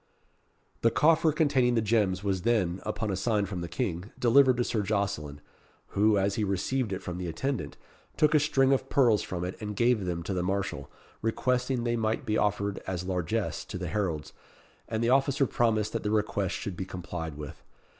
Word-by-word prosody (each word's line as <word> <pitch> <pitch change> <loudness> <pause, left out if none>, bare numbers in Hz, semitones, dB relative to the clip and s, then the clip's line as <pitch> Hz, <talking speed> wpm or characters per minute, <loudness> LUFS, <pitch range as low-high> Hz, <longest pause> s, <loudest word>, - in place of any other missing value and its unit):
The 115 - +5
coffer 160 +6 +4
containing 140 -5 +2
the - - +3
gems 100 -4 +1
was 95 -2 0
then, 95 -5 +1
upon 105 0 -2
a - - -1
sign 105 +1 +1
from 95 -2 -5
the 85 - -4
King, 90 -1 -3
delivered 130 +1 +5
to 120 - +2
Sir 110 -2 -1
Jocelyn, 100 -8 -2 0.5
who, 105 +1 +3
as 100 +1 +1
he 110 - -1
received 105 +5 -1
it 95 - -4
from 90 0 -5
the 90 - -3
attendant, 85 - -3 0.4
took 150 0 +4
a 155 - +6
string 135 -2 +3
of 135 0 -1
pearls 120 -6 +4
from 90 -1 -4
it 90 - -4
and 105 -1 -4
gave 120 -3 +2
them 85 -1 -3
to 95 - -3
the 90 - -1
marshal, 95 +2 -2 0.3
requesting 125 +2 0
they 120 0 0
might 110 +5 -1
be 110 -2 0
offered 100 -1 0
as 90 -1 -2
largesse 90 -2 -2
to - - -6
the 90 -2 -4
heralds; 85 -6 -2 0.5
and 110 +1 -2
the 120 - +2
officer 135 +1 +3
promised 110 -3 +1
that - - -1
the 105 - -2
request 105 -3 0
should 100 - -5
be 95 - -4
complied 90 -4 -6
with. 75 0 -8
105 Hz, 195 wpm, -28 LUFS, 90-120 Hz, 0.5 s, a